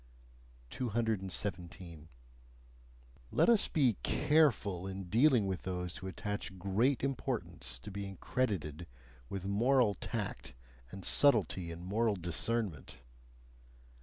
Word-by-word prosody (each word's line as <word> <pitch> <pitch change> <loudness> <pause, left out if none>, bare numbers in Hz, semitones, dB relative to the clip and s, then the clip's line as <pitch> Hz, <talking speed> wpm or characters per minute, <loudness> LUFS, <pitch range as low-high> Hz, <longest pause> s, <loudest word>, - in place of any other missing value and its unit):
217. 95 - -2 1.2
Let - - +3
us 230 -3 +5
be 130 - +2
careful 110 - +2
in 95 0 -5
dealing 120 - +5
with 95 -2 -2
those 90 -2 -4
who 95 -1 -7
attach 105 0 -4
great 105 +10 +1
importance 135 - -3
to 60 - -9
being 100 -1 -6
credited 85 - -2 0.4
with 95 -1 -5
moral 115 +3 +3
tact 90 - -5 0.3
and 95 +7 -8
subtlety 100 - +3
in 85 +1 -7
moral 105 +3 +1
discernment! 90 - -3
100 Hz, 105 wpm, -33 LUFS, 90-115 Hz, 1.2 s, us